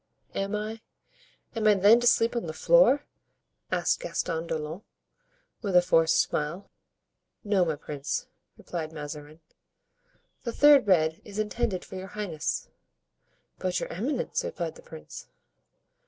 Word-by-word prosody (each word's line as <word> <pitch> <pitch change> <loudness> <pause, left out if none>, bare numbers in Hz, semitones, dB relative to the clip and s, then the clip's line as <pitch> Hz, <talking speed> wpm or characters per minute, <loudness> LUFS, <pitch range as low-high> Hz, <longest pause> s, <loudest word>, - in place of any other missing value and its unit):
"Am 195 +1 -2
I—am 220 - -7
I, 210 - +6
then, 205 +4 +6
to 240 - +1
sleep 230 +1 +3
on 235 -7 -2
the 155 - -4
floor?" - - +4 0.7
asked - - +1
Gaston 170 - -3
d'Orleans, 160 +3 -4 0.8
with 200 -5 -2
a 180 - +8
forced 165 -2 +3
smile. 155 +6 -2 0.7
"No, 200 -4 +2
my 160 -3 0
prince," 145 -1 -4 0.3
replied 160 -3 -5
Mazarin, 150 0 -8 1.0
"the 235 - -3
third 290 -4 +6
bed 160 -4 +3
is 205 0 -10
intended 215 -3 -1
for 190 - -8
your 185 +1 -7
highness." 175 -8 -3 0.9
"But 185 -1 -1
your - - -5
eminence?" 245 - -2
replied 170 -3 -4
the - - -15
prince. 75 -1 -11
185 Hz, 130 wpm, -27 LUFS, 160-220 Hz, 1.0 s, a